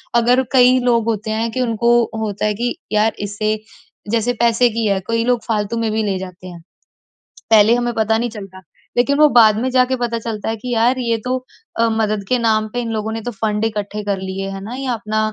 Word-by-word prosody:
अगर 245 +2 +4
कई 255 0 +6
लोग 235 -2 +2
होते 220 -1 -2
हैं 225 +1 -1
कि 255 - -2
उनको 235 -1 +1 0.3
होता 210 -1 -2
है 210 - +1
कि 240 +3 -2 0.2
यार 215 +1 +2
इसे 215 +1 -2 0.5
जैसे 230 +1 +1
पैसे 235 +1 +3
की 230 0 -2
है 200 -1 +1
कई 230 0 0
लोग 245 -1 +1
फ़ालतू 215 0 -1
में 225 -1 -1
भी 220 +1 0
ले 200 -2 -1
जाते 185 0 -9
हैं। 175 -2 -10 0.9
पहले 220 +1 +6
हमें 240 0 -1
पता 220 0 +1
नहीं 240 +1 -2
चलता 195 -4 -10 0.4
लेकिन 255 +4 +3
वो 305 0 +7
बाद 220 -4 +6
में 255 - 0
जाके 255 0 +2
पता 240 -2 -2
चलता 220 -2 -5
है 225 - -2
कि 245 +3 -6
यार 240 +3 +2
ये 230 -2 0
तो 255 +1 0 0.4
अ, 230 0 +3
मदद 215 -2 0
के 255 - +2
नाम 220 -2 +1
पे 245 - 0
इन 235 -1 -4
लोगों 220 0 -3
ने 225 - -4
तो 245 - -4
फ़ंड 210 0 -1
इकट्ठे 210 -1 -3
कर 200 -1 -1
लिए 190 +1 -4
हैं 195 0 -6
ना। 220 +5 -7
ये 270 +1 -5
अपना 215 -1 -3
225 Hz, 225 wpm, -18 LUFS, 210-240 Hz, 0.9 s, वो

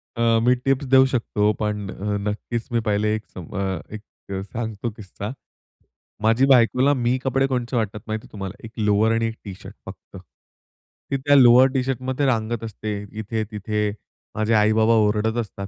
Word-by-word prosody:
अ, 115 -1 +3
मी 125 +1 +4
tips 135 +2 -1
देऊ 130 0 +8
शकतो. 115 -5 0
पण 105 -1 -2
अ, 105 +2 -3
नक्कीच 115 +2 -4
मी 120 - +2
पहिले 105 +1 +1
एक 110 - -6
सा - - -10
अ, 95 0 -4
एक 105 - -8 0.5
सांगतो 115 -1 -4
किस्सा. 105 0 -8 0.9
माझ्या 115 +5 +4
बायकोला 130 +2 +4
मी 125 -1 +1
कपडे 135 0 +1
कोणचे 125 -1 -2
वाटतात 105 -2 -2
माहिती 110 0 -4
आहे - - -19
तुम्हाला, 95 -2 -6
एक 110 - -10
लोवर 105 0 +2
आणि 115 0 +1
एक 115 - -5
टी-शर्ट 95 -2 -9
फक्त. - - -11 0.9
ती 140 - +1
त्या 145 +2 +3
लोवर 125 -1 +7
टी-शर्टमध्ये 130 +1 -1
रांगत 115 -3 0
असते 110 -1 -5 0.2
इथे-तिथे. 105 -1 -2 0.4
माझे 110 +1 0
आई-बाबा 110 +1 +4
ओरडत 110 +2 0
असतात. 100 -4 -4
110 Hz, 160 wpm, -22 LUFS, 105-125 Hz, 0.9 s, देऊ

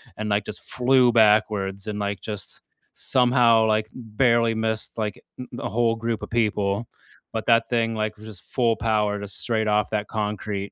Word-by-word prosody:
and, 110 0 -4
like, 100 0 +1
just 105 - -8
flew 125 0 +3
backwards 105 -3 +2
and, 105 -1 -3
like, 100 -1 -3
just 105 -2 -7 0.3
somehow, 120 -3 +3
like, 110 0 +1
barely 115 -1 +1
missed, 110 0 -3
like, 105 -3 -3 0.2
th 125 - -7
the 120 - -5
whole 115 0 +1
group 115 0 -3
of - - -6
people, 105 -1 0 0.5
but 110 -1 -3
that 115 -1 +3
thing, 115 -2 +1
like, 110 -1 -2
just 110 -3 -11
full 120 -3 +1
power 105 -2 0
to 100 - -6
straight 110 +2 -2
off 105 0 +1
that 105 -1 -1
concrete. 105 -2 -3
110 Hz, 175 wpm, -24 LUFS, 105-115 Hz, 0.5 s, flew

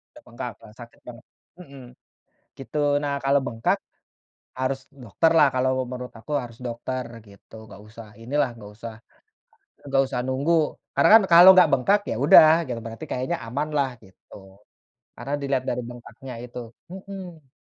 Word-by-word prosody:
Te - - -14
bengkak 120 +1 -7
yang 110 -1 -15
sakit 120 0 -14
banget 125 0 -11 0.4
mhm. 140 -6 -13 0.8
Gitu. 135 +3 -6 0.2
Nah, 145 -1 -2
kalau 140 +1 +3
bengkak, 115 0 -1 0.8
harus 130 +1 -2 0.2
dokter 125 +9 +1
lah, 150 - +6
kalau 130 0 +1 0.2
menurut 125 0 -7
aku 130 - -12
harus 115 -2 -11
dokter 125 +2 -5 0.2
gitu. 100 +2 -18
Enggak 105 - -13
usah 110 +1 -12
inilah, 135 +3 0
enggak 105 -3 -13
usah 115 +1 -9 0.9
enggak 135 -1 +2
usah 130 -2 -4
nunggu. 135 +6 0 0.4
Karena - - +4
kan - - -2
kalau 175 +2 +9
enggak 185 -1 +5
bengkak, 140 +10 +3
ya - - -2
udah 155 +1 +8 0.2
gitu. 120 -2 -4
Berarti 115 0 -8
kayaknya 130 +7 -2
aman 140 +6 -3
lah 140 -2 +1
gitu, 95 -1 -18 0.8
karena 140 - -6
dilihat 135 -2 -1
dari 125 0 -2
bengkaknya 120 +2 -11
itu 125 0 -9 0.3
mhm. 185 -6 -10
130 Hz, 155 wpm, -23 LUFS, 115-145 Hz, 0.9 s, kalau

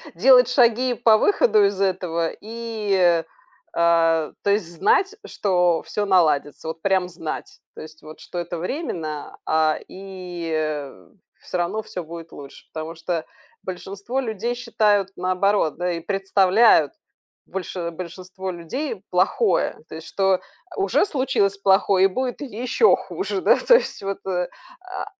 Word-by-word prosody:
делать 250 +5 +6
шаги 245 0 +3
по 225 -2 +4
выходу 400 - +4
из 200 0 -1
этого 175 -3 0
и, 210 -6 0 0.5
а 165 -2 +3
то 200 - +1
есть 200 -4 +1
знать, 390 - +2
что 180 -4 +1
всё 205 -1 -2
наладится. 160 -5 +2
Вот 160 0 -5
прям 190 -2 +1
знать. 165 -2 -7 0.2
То - - -9
есть 155 0 -12
вот, 155 +1 -12
что 175 - -9
это 175 0 -4
временно, 165 - -4
а, 155 -1 +2
и 170 -6 -4 0.5
всё - - -5
равно 175 +5 -1
всё 180 -4 -7
будет 165 0 -10
лучше. 140 -1 -12
Потому 160 +1 -6
что 165 0 -3 0.4
большинство 200 +7 -5
людей 235 -1 -2
считают 210 -5 +1
наоборот, 185 -2 +1
да, 180 +1 -1
и 165 - -3
представляют 195 - +3 0.5
больше 180 -2 -5
большинство 185 +2 -7
людей 220 - -5
плохое, 455 - +1
то - - -9
есть 160 0 -9
что, 195 -1 +2
э, - - -5 0.4
уже 395 0 +2
случилось 260 - 0
плохое 195 -1 +4
и - - +7
будет 255 +7 -3
еще 255 - +2
хуже. 385 0 -4
Да, - - +5
то 485 - +5
есть - - 0
вот, 195 0 -3
э, 180 -2 -1 0.3
а 375 +1 -6
190 Hz, 145 wpm, -22 LUFS, 170-220 Hz, 0.5 s, и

